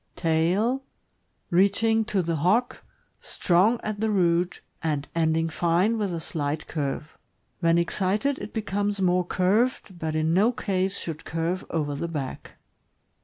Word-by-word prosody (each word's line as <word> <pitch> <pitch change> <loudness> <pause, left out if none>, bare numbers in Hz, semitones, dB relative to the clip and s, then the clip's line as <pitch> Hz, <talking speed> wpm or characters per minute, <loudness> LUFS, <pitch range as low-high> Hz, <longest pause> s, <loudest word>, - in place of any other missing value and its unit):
Tail. 180 +11 +1 0.3
— - - -46 0.3
Reaching 210 +5 +3
to 195 -3 0
the 165 -1 -1
hock, 210 +11 +1 0.4
strong 195 +7 +2
at 215 -1 -3
the 220 +1 +1
root, 175 -3 +1 0.2
and 150 -3 -1
ending 160 0 +1
fine 175 +7 +1
with 205 -3 -1
a 170 - -3
slight 150 -1 -3
curve. 150 0 -4 0.4
When 170 -1 +3
excited, 200 +10 0
it 210 - -7
becomes 205 -2 -1
more 180 -1 +2
curved, 195 0 +1
but 160 -1 -2
in 155 +1 +1
no 210 +7 +4
case 195 -4 -1
should 160 -2 -5
curve 165 +3 -2
over 150 -3 -1
the 145 +4 -3
back. 145 -6 -6
180 Hz, 145 wpm, -26 LUFS, 165-205 Hz, 0.4 s, no